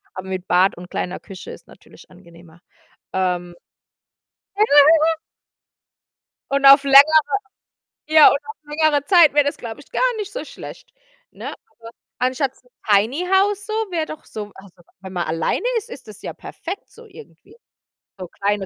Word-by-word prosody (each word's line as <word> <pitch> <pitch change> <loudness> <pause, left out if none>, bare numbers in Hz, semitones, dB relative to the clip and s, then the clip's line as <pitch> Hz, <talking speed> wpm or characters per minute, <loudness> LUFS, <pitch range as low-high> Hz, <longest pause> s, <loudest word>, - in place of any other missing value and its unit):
aber 185 0 -8
mit 185 -1 -5
Bad 180 +1 +2
und 180 0 -11
kleiner 180 - -4
Küche 190 -2 -11
ist - - -13
natürlich - - -18
angenehmer. 170 0 -18 0.5
Ähm 180 -2 -2 1.0
Ja, 425 - +4 0.4
ja. 320 0 +1 1.3
Und 275 0 0
auf 275 +1 +8
längerer 280 +3 +7 0.9
ja, 310 -1 +7
und - - +1
auf 295 +1 -9
längere 295 -1 0
Zeit 345 -7 +5
wäre 290 -1 +3
das, 285 - -2
glaube 230 +2 -8
ich, - - -22
gar - - -2 0.2
nicht 415 -2 -6
so - - -5
schlecht, - - -11 0.4
ne? - - -8
Aber - - -11 0.6
anstatt 255 +2 -1
s - - -28
‘n 250 - -28 0.2
Tiny 230 - +2
House 400 +2 +1
so, 430 - -6 0.2
wäre 325 -2 -1
doch 310 0 -10
so 210 -1 -8
also, 190 -2 -17 0.2
wenn 190 0 -10
man 175 -1 -2
alleine 165 - -2
ist, 430 - -5
ist 255 - -11
das 210 -1 -12
ja - - -6
perfekt 375 +4 -9
so 470 0 -16
irgendwie. 445 +3 -17 0.6
So 180 - -7
kleine 200 +1 -2
275 Hz, 165 wpm, -20 LUFS, 190-315 Hz, 1.3 s, auf